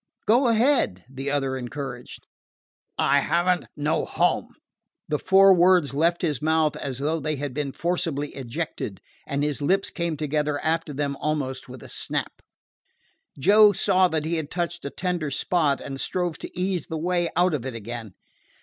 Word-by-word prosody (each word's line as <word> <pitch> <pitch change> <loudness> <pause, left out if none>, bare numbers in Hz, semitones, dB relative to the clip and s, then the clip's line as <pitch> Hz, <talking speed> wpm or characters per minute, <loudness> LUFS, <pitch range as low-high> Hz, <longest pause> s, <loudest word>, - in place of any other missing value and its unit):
"Go 245 +4 +4
ahead," 230 - +2
the 135 +1 -4
other 135 -2 0
encouraged. 125 0 -7 0.7
"I 140 +1 +4
have 170 +5 +1
n't - - -15
no 150 +2 0
home." - - +1 0.6
The 150 - -1
four 195 0 +6
words 175 -5 +4
left 170 +5 +1
his 150 -5 0
mouth 155 -1 +2
as 135 -3 -5
though 155 +4 -1
they 155 +1 -2
had 140 -1 -4
been 145 0 -2
forcibly 165 -3 -1
ejected, 130 - -5 0.3
and 140 +1 -1
his 150 -1 -1
lips 190 +7 +1
came 170 -3 -2
together 150 0 -1
after 160 -1 0
them 140 0 -2
almost 135 -4 -3
with 125 -1 -10
a - - -10
snap. - - -4 1.0
Joe 205 +7 +6
saw 185 0 +3
he 160 +1 -1
had 155 -2 -4
touched 175 0 -3
a - - -2
tender 175 -2 -2
spot, 150 -1 +1
and 135 -1 -6
strove 175 -3 -2
to - - -8
ease 185 -3 -1
the 160 - -4
way 175 +1 0
out 180 -1 +3
of 140 -6 -2
it 130 -2 -5
again. 115 -2 -7
155 Hz, 170 wpm, -25 LUFS, 140-175 Hz, 1.0 s, four